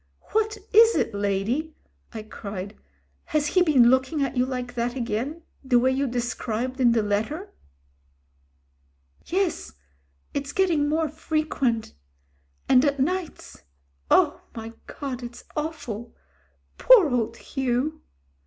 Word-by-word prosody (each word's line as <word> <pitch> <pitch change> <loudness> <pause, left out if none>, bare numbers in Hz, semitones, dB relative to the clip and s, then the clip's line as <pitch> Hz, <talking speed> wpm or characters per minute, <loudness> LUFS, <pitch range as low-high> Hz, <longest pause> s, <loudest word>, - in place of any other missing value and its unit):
"What 435 0 +1 0.2
is 450 +2 +7
it, 230 - 0
lady," 205 +10 -1 0.4
I 220 -2 -7
cried. 200 -2 -7 0.5
"Has 305 -1 0
he 365 +5 +2
been 265 -8 +5
looking 260 +3 +1
at 275 - -2
you 250 0 +2
like 250 -1 -4
that 240 +1 -2
again, 255 +7 -3 0.2
the 260 -2 +3
way 255 +2 +3
you 270 +1 0
described 245 +1 -3
in 240 -2 +5
the 225 -2 +2
letter?" 220 - -2 1.7
"Yes 365 - -1 0.3
— 70 0 -41
it's 280 0 -3
getting 330 -6 +2
more 315 +1 +1
frequent. 305 -7 -1 0.7
And 255 -1 +5
at 285 -1 +1
nights 355 +5 -3 0.2
— 70 0 -41
oh! - - +4
my 225 0 -7
God! 265 -3 -5
it's 240 -1 -9
awful. 250 -8 -5 0.6
Poor 425 - +7
old 230 -2 -1
Hugh." 265 +3 -2
260 Hz, 130 wpm, -25 LUFS, 230-310 Hz, 1.7 s, is